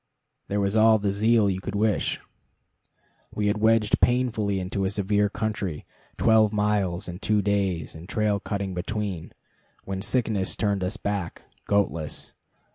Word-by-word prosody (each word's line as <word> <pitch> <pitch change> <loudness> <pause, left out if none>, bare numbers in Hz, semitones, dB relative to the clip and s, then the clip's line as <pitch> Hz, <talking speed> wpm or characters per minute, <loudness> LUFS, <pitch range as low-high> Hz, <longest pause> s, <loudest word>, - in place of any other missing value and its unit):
There 105 - -1
was 100 +1 0
all 110 0 +6
the 100 -1 0
zeal 110 +1 +3
you 95 -1 -1
could 100 - -5
wish. 105 0 +1 1.2
We 105 - -1
had 105 +1 +1
wedged 110 -1 +3
painfully 115 -6 +2
into 95 +2 -2
a 95 - +1
severe 105 +1 +1
country 100 -7 -3 0.3
twelve 110 -2 +4
miles 105 -3 0
in 90 0 -6
two 105 -1 +1
days, 95 -5 0
and 80 +4 -11
trail 105 -2 +1
cutting 100 -1 -3
between 95 -1 -4 0.5
when 95 0 -4
sickness 110 -3 0
turned 100 -3 0
us 95 +4 -2
back, 100 -5 -3 0.2
goatless. 85 -7 -1
100 Hz, 145 wpm, -25 LUFS, 95-110 Hz, 1.2 s, all